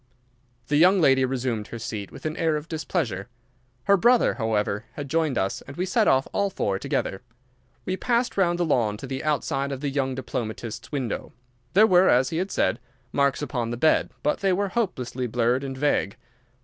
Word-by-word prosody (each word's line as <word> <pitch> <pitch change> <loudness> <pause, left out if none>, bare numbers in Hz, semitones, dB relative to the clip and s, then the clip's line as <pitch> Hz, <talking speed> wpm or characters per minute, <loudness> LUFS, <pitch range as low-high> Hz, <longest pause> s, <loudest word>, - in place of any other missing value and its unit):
The 145 - +2
young 185 +5 +6
lady 135 -5 +4
resumed 125 -4 -2
her 120 - -7
seat 110 -3 -5
with 135 - -12
an 155 0 -2
air 160 -2 +1
of 150 +1 -4
displeasure. 150 - -2 0.6
Her 200 - +4
brother, 240 +6 +4
however, 110 -2 -1
had 145 -1 -6
joined 155 -2 0
us 95 - -1
and 140 - -10
we 180 - 0
set 210 +3 +2
off 130 0 +3
all 200 0 +1
four 100 - -1
together. 95 - -2 0.6
We 185 - -2
passed 240 +2 0
round 175 -3 +2
the 175 - +1
lawn 110 -9 +1
to 135 - -8
the 135 0 -4
outside 140 -2 -1
of 135 - -4
the 145 -2 -2
young 135 -2 -1
diplomatist's 120 -3 -5
window. 130 -7 -3 0.4
There 215 +3 +8
were, 185 -3 +5
as 125 +1 +3
he 160 - -2
had 185 +3 -1
said, - - 0 0.3
marks 140 0 +1
upon 120 -5 -2
the 120 - -3
bed, 155 +6 +3
but 150 - +1
they 195 -1 +2
were 200 +2 0
hopelessly 130 - -2
blurred 120 +3 +1
and 135 -1 -5
vague. 145 -7 +1
140 Hz, 195 wpm, -25 LUFS, 120-175 Hz, 0.6 s, There